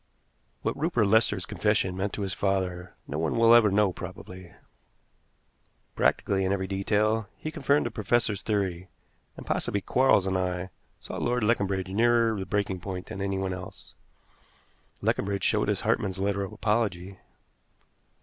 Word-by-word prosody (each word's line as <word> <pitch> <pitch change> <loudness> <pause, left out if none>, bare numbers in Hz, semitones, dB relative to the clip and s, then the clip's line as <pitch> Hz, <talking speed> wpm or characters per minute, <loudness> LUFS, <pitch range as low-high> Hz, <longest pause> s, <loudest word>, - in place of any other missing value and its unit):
What - - -1
Rupert 150 -8 +1
Lester's 100 -2 +2
confession 105 -3 0
meant 95 +2 -2
to 105 - -3
his 95 0 -3
father 90 -3 -2
no 75 - -3
one 80 +5 0
will 115 0 +6
ever 115 -3 +7
know 100 -1 +2
probably. 90 0 -9 1.4
Practically, 95 -1 +1
in 95 - 0
every 95 -1 0
detail, 105 +3 0
he 155 - -5
confirmed 145 -2 +1
the - - -2
professor's 105 -1 0
theory, 95 -4 -2 0.5
and - - -9
possibly 100 - -1
Quarles 125 -1 +3
and 95 -1 0
I 90 0 -2 0.3
saw - - -7
Lord 120 -1 0
Leconbridge 100 -4 0
nearer 115 +1 +3
the 95 - -5
breaking 100 -2 -1
point 90 0 -6
than 95 - -6
anyone 95 -1 -1
else. 90 0 -9 1.1
Leconbridge 100 0 0
showed - - +2
us - - 0
Hartmann's 95 -1 0
letter 100 +1 0
of 95 - -6
apology. 100 -4 -1
100 Hz, 150 wpm, -27 LUFS, 95-110 Hz, 1.4 s, ever